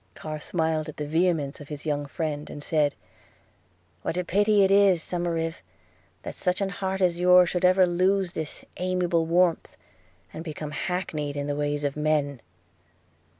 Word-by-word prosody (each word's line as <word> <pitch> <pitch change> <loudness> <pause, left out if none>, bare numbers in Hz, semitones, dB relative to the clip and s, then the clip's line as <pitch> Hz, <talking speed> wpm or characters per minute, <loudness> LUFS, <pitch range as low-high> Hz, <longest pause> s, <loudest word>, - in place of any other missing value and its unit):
Carr 155 -1 -6
smiled 160 -1 -1
at 155 - -10
the 150 - -3
vehemence 160 -2 0
of 145 - -10
his 150 0 -7
young 145 -1 -1
friend, 150 -1 -4
and 145 - -8
said, 150 -3 +1 1.1
'What 165 - -3
a 180 - 0
pity 205 +3 +3
it 190 - +3
is, 195 -4 +5
Somerive, 165 -2 -2 0.6
that - - -5
such 180 -1 -1
an 195 -1 0
heart 190 0 -3
as 175 -1 +2
yours 180 -1 +6
should 180 0 -2
ever 185 +1 +6
lose 185 +1 +1
this 155 -1 -5
amiable 180 -2 0
warmth, 170 0 +1 0.6
and 160 - -6
become 155 -2 -6
hackneyed 150 -4 -3
in 140 - -2
the 145 0 -2
ways 145 0 -1
of 140 -1 -1
men!' 150 -4 0
165 Hz, 165 wpm, -26 LUFS, 150-180 Hz, 1.1 s, yours